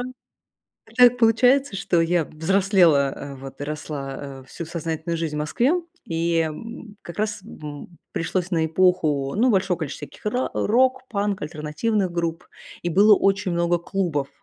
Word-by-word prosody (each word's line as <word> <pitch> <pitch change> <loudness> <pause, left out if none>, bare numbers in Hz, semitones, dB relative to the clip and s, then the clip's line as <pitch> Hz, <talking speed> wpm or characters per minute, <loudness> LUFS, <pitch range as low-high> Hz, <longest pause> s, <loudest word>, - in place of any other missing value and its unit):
а 255 0 -9 0.7
так 245 0 +6
получается, 245 +2 +4
что 175 -2 +1
я 165 0 +2
взрослела, 170 -3 +3
а, 140 0 -8
вот 135 +1 -10
и - - -2
росла, 140 -2 -6
э, - - -18
всю 170 - -6
сознательную 165 0 -3
жизнь 160 -2 -3
в - - -2
Москве, 235 - +1 0.3
и, 165 0 0
м, 210 +7 -6
как 170 - -10
раз 215 -1 -2
м, 215 - -12
м, 150 +3 -9
пришлось 180 +2 -2
на 160 -2 +2
эпоху, 160 -5 +2
ну, 245 +4 +4
большого 190 -4 +1
количества 150 -2 -5
всяких - - -15
ра 250 +5 0
э, - - 0
рок-панк, 235 -5 +1
альтернативных 165 +6 -1
групп, 170 -1 -2 0.4
и 175 - -1
было 205 +5 +6
очень 195 -1 +1
много 170 0 +1
клубов 170 -6 -2
175 Hz, 160 wpm, -23 LUFS, 155-210 Hz, 0.7 s, так